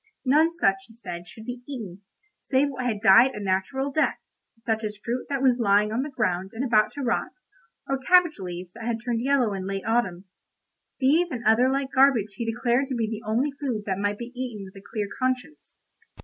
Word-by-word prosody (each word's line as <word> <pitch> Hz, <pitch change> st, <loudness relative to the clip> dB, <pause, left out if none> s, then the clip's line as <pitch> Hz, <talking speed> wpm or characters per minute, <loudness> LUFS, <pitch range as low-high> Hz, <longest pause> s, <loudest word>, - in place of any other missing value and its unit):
None 305 Hz, +5 st, +4 dB
such, 195 Hz, -13 st, +2 dB
he 225 Hz, -, -15 dB
said, 175 Hz, -6 st, -8 dB
should 220 Hz, +5 st, -11 dB
be 245 Hz, 0 st, -6 dB
eaten, 205 Hz, -9 st, -7 dB, 0.4 s
save 275 Hz, +1 st, +1 dB
what 255 Hz, -2 st, -3 dB
had 215 Hz, -4 st, -2 dB
died 235 Hz, +8 st, +6 dB
a -, -, -5 dB
natural 205 Hz, +8 st, -1 dB
death, 310 Hz, +3 st, +1 dB, 0.5 s
such 225 Hz, -1 st, -1 dB
as 210 Hz, -1 st, -4 dB
fruit 240 Hz, +4 st, -4 dB
that 275 Hz, -2 st, -1 dB
was 255 Hz, -2 st, +4 dB
lying 210 Hz, -1 st, +3 dB
on 230 Hz, +3 st, 0 dB
the 290 Hz, -, -4 dB
ground 190 Hz, -7 st, -1 dB
and 250 Hz, +4 st, -2 dB
about 215 Hz, -4 st, +3 dB
to 285 Hz, -, -5 dB
rot, 235 Hz, -2 st, -1 dB, 0.5 s
or 270 Hz, -1 st, -1 dB
cabbage 345 Hz, -, +4 dB
leaves 180 Hz, -1 st, -7 dB
that 230 Hz, 0 st, -9 dB
had 235 Hz, -1 st, 0 dB
turned 235 Hz, -2 st, 0 dB
yellow 255 Hz, -5 st, +2 dB
in 190 Hz, -1 st, -4 dB
late 195 Hz, 0 st, -4 dB
autumn. 205 Hz, -6 st, 0 dB, 0.7 s
These 310 Hz, +7 st, +3 dB
and 245 Hz, -6 st, -5 dB
other 225 Hz, +4 st, +5 dB
like 270 Hz, 0 st, -1 dB
garbage 260 Hz, -7 st, +4 dB
he 225 Hz, +3 st, -3 dB
declared 240 Hz, +3 st, +1 dB
to 260 Hz, -, -3 dB
be 230 Hz, -2 st, 0 dB
the 220 Hz, 0 st, -5 dB
only 250 Hz, +7 st, +1 dB
food 270 Hz, -7 st, -3 dB
that 190 Hz, -1 st, -2 dB
might 205 Hz, 0 st, -1 dB
be 235 Hz, +1 st, -7 dB
eaten 240 Hz, -6 st, -5 dB
with 190 Hz, -, -14 dB
a 195 Hz, -, -11 dB
clear 210 Hz, -2 st, -1 dB
conscience. 255 Hz, +3 st, -3 dB
235 Hz, 210 wpm, -25 LUFS, 205-265 Hz, 0.7 s, died